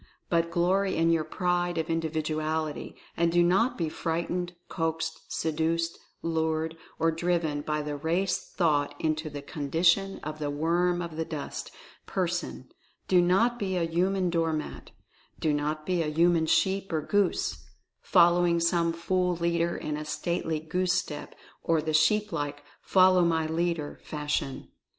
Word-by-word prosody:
But 170 Hz, -1 st, +2 dB
glory 185 Hz, +3 st, +1 dB
in 165 Hz, +1 st, +3 dB
your 165 Hz, -2 st, +2 dB
Pride 175 Hz, 0 st, -1 dB
of 160 Hz, -1 st, -1 dB
Individuality, 155 Hz, -1 st, -2 dB, 0.2 s
and 170 Hz, 0 st, +2 dB
do 175 Hz, 0 st, +4 dB
not 195 Hz, +8 st, +2 dB
be 165 Hz, -, 0 dB
frightened, 170 Hz, +3 st, -2 dB
coaxed, 165 Hz, -1 st, -3 dB
seduced, 165 Hz, +1 st, -1 dB, 0.2 s
lured, 160 Hz, -1 st, -1 dB, 0.2 s
or 165 Hz, 0 st, +2 dB
driven 165 Hz, -3 st, 0 dB
by 150 Hz, 0 st, -2 dB
the 150 Hz, 0 st, -3 dB
Race 170 Hz, +6 st, 0 dB
Thought 150 Hz, -5 st, +1 dB
into 155 Hz, 0 st, -1 dB
the 145 Hz, -1 st, -7 dB
condition 165 Hz, +7 st, +1 dB
of 155 Hz, +1 st, -5 dB
"the 150 Hz, -1 st, -2 dB
worm 175 Hz, +4 st, +1 dB
of 165 Hz, -2 st, -7 dB
the 160 Hz, -, 0 dB
dust" 155 Hz, -3 st, -6 dB, 0.4 s
person -, -, -3 dB, 0.2 s
— -, -, -41 dB
do 180 Hz, -1 st, +5 dB
not 225 Hz, +8 st, +3 dB
be 190 Hz, -2 st, -1 dB
a 175 Hz, -, +1 dB
"human 180 Hz, +2 st, +1 dB
door 165 Hz, -1 st, +1 dB
mat" 155 Hz, -1 st, -5 dB, 0.3 s
— -, -, -32 dB
do 155 Hz, -, +1 dB
not 150 Hz, +1 st, -2 dB
be 180 Hz, 0 st, +1 dB
a 160 Hz, -, -1 dB
human 165 Hz, +1 st, +3 dB
sheep 195 Hz, +3 st, +1 dB
or 155 Hz, -2 st, 0 dB
goose, 205 Hz, +3 st, 0 dB, 0.4 s
following 175 Hz, -1 st, +4 dB
some 170 Hz, 0 st, +2 dB
fool 180 Hz, +1 st, 0 dB
leader 170 Hz, 0 st, 0 dB
in 150 Hz, -1 st, -3 dB
a 150 Hz, -, -4 dB
stately 160 Hz, +1 st, -2 dB
goose 180 Hz, +3 st, 0 dB
step, 155 Hz, -5 st, -3 dB, 0.3 s
or 165 Hz, -1 st, +2 dB
the 155 Hz, 0 st, -2 dB
sheep 210 Hz, +7 st, +3 dB
like 145 Hz, 0 st, -3 dB, 0.2 s
"follow 185 Hz, -1 st, +5 dB
my 165 Hz, -2 st, +2 dB
leader" 160 Hz, -1 st, -2 dB
fashion. 150 Hz, -3 st, -3 dB
165 Hz, 155 wpm, -28 LUFS, 155-175 Hz, 0.4 s, do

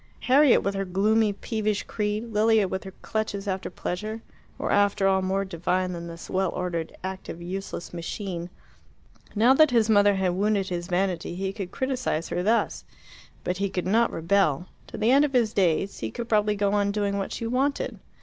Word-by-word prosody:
Harriet 275 Hz, +1 st, +5 dB
with 200 Hz, -, 0 dB
her 195 Hz, 0 st, -1 dB
gloomy 210 Hz, +4 st, +2 dB
peevish 215 Hz, 0 st, -2 dB
creed, 215 Hz, +1 st, -3 dB
Lilia 215 Hz, -1 st, +4 dB
with 190 Hz, +1 st, -4 dB
her 190 Hz, -, -8 dB
clutches 215 Hz, -2 st, -3 dB
after 190 Hz, -1 st, -2 dB
pleasure, 215 Hz, +5 st, -5 dB, 0.3 s
were -, -, -2 dB
after 205 Hz, -1 st, +3 dB
all 190 Hz, 0 st, +3 dB
more 190 Hz, +1 st, 0 dB
divine 185 Hz, +1 st, -1 dB
than 170 Hz, 0 st, -6 dB
this 165 Hz, 0 st, -9 dB
well 190 Hz, -1 st, 0 dB
ordered, 170 Hz, -3 st, -3 dB
active, 190 Hz, -2 st, -6 dB
useless 180 Hz, 0 st, -6 dB
machine. 175 Hz, 0 st, -5 dB, 0.9 s
Now 230 Hz, +5 st, +5 dB
that 310 Hz, +2 st, +6 dB
his 230 Hz, -3 st, +3 dB
mother 205 Hz, -1 st, +5 dB
had 190 Hz, -1 st, +1 dB
wounded 200 Hz, 0 st, +1 dB
his 175 Hz, -1 st, -3 dB
vanity 180 Hz, -2 st, -1 dB
he 190 Hz, +1 st, -3 dB
could 195 Hz, -3 st, -5 dB
criticize 255 Hz, -, -2 dB
her 175 Hz, -, -1 dB
thus. 220 Hz, +5 st, +1 dB, 0.6 s
But 180 Hz, -, -2 dB
he 200 Hz, +1 st, -1 dB
could 180 Hz, -2 st, -3 dB
not 225 Hz, +5 st, +3 dB
rebel. 170 Hz, -2 st, +1 dB, 0.2 s
To -, -, -8 dB
the 220 Hz, +3 st, +2 dB
end 280 Hz, +2 st, +6 dB
of 290 Hz, -2 st, 0 dB
his 235 Hz, -4 st, +2 dB
days 195 Hz, 0 st, +1 dB
he 110 Hz, -, -3 dB
could 235 Hz, -, -6 dB
probably 210 Hz, -2 st, +2 dB
go 200 Hz, 0 st, +1 dB
on 200 Hz, -1 st, +2 dB
doing 200 Hz, -1 st, -1 dB
what 195 Hz, -, -3 dB
she 230 Hz, -, -4 dB
wanted. 265 Hz, +4 st, -1 dB
200 Hz, 190 wpm, -26 LUFS, 185-215 Hz, 0.9 s, that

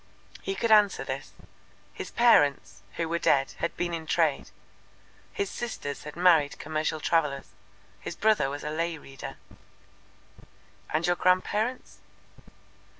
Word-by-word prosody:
He 195 Hz, -, -3 dB
could 230 Hz, +3 st, 0 dB
answer 210 Hz, -2 st, +5 dB
this. -, -, -5 dB, 0.6 s
His -, -, -6 dB
parents, 150 Hz, -, +3 dB
who 165 Hz, -, -1 dB
were 170 Hz, +1 st, -1 dB
dead, 135 Hz, -4 st, +2 dB
had 170 Hz, -, -2 dB
been 175 Hz, -1 st, -2 dB
in 160 Hz, -1 st, -5 dB
trade; 155 Hz, -3 st, +1 dB, 0.8 s
his 405 Hz, -2 st, -3 dB
sisters 150 Hz, -14 st, -5 dB
had 150 Hz, -, -8 dB
married 165 Hz, -5 st, +4 dB
commercial 155 Hz, +1 st, -2 dB
travellers; 150 Hz, -4 st, 0 dB, 0.5 s
his -, -, -6 dB
brother 215 Hz, -10 st, +2 dB
was 145 Hz, +1 st, -6 dB
a 150 Hz, -, -3 dB
lay 165 Hz, +1 st, -2 dB
reader. 135 Hz, -3 st, -9 dB, 1.5 s
"And 155 Hz, +2 st, +1 dB
your 175 Hz, -, +2 dB
grandparents?" 210 Hz, +7 st, 0 dB
165 Hz, 130 wpm, -27 LUFS, 150-195 Hz, 1.5 s, answer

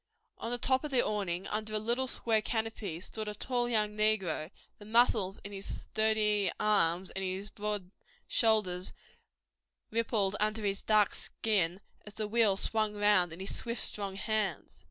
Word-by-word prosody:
On 230 Hz, -, -4 dB
the 245 Hz, -, 0 dB
top 260 Hz, +3 st, +1 dB
of 300 Hz, -, -3 dB
the 255 Hz, -3 st, +2 dB
awning, 190 Hz, -4 st, -2 dB
under 215 Hz, 0 st, -3 dB
a -, -, +3 dB
little 235 Hz, +5 st, 0 dB
square 225 Hz, -3 st, +2 dB
canopy, 220 Hz, -7 st, -3 dB
stood 215 Hz, +2 st, -4 dB
a 210 Hz, -, -4 dB
tall 245 Hz, +2 st, -1 dB
young 210 Hz, -2 st, 0 dB
negro; 200 Hz, -7 st, +1 dB, 0.3 s
the 205 Hz, -, -12 dB
muscles 215 Hz, -4 st, +3 dB
in 200 Hz, -, -8 dB
his 195 Hz, -1 st, -4 dB
sturdy 210 Hz, -3 st, +1 dB
arms 185 Hz, -3 st, +3 dB
and 190 Hz, -, -4 dB
his 190 Hz, +3 st, -4 dB
broad 205 Hz, -3 st, -3 dB, 0.4 s
shoulders 205 Hz, -5 st, +2 dB, 1.0 s
rippled 215 Hz, -3 st, 0 dB
under 215 Hz, 0 st, +2 dB
his 195 Hz, 0 st, 0 dB
dark 210 Hz, -2 st, +3 dB
skin 190 Hz, -4 st, 0 dB, 0.2 s
as 210 Hz, -, -10 dB
the 215 Hz, -1 st, -3 dB
wheel 215 Hz, -3 st, +3 dB
swung 215 Hz, 0 st, 0 dB
round 205 Hz, -4 st, +4 dB
in 165 Hz, -, -9 dB
his 195 Hz, -, -4 dB
swift, 235 Hz, 0 st, -2 dB
strong 200 Hz, -2 st, -2 dB
hands. 210 Hz, -2 st, -2 dB
210 Hz, 165 wpm, -31 LUFS, 195-220 Hz, 1.0 s, round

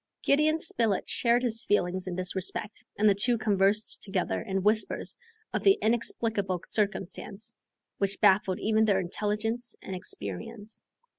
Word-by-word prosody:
Gideon 305 Hz, +3 st, +3 dB
Spilett 225 Hz, -, 0 dB
shared 240 Hz, +1 st, +2 dB
his 230 Hz, -2 st, 0 dB
feelings 185 Hz, -2 st, 0 dB
in 180 Hz, -, -3 dB
this 185 Hz, +1 st, -3 dB
respect, 195 Hz, +3 st, -2 dB
and 215 Hz, -, +4 dB
the 205 Hz, -, +6 dB
two 235 Hz, +5 st, +2 dB
conversed 210 Hz, 0 st, +2 dB
together 195 Hz, -3 st, -1 dB
in 195 Hz, -3 st, -2 dB
whispers 215 Hz, +1 st, +1 dB, 0.4 s
of -, -, 0 dB
the 395 Hz, +1 st, +5 dB
inexplicable 220 Hz, -4 st, 0 dB
circumstance 200 Hz, 0 st, -2 dB, 0.5 s
which 200 Hz, 0 st, 0 dB
baffled 190 Hz, -1 st, +4 dB
even 220 Hz, 0 st, +2 dB
their 200 Hz, -3 st, +3 dB
intelligence 215 Hz, +5 st, -2 dB
and 190 Hz, -, -6 dB
experience. 220 Hz, +3 st, -4 dB
210 Hz, 140 wpm, -28 LUFS, 195-225 Hz, 0.5 s, the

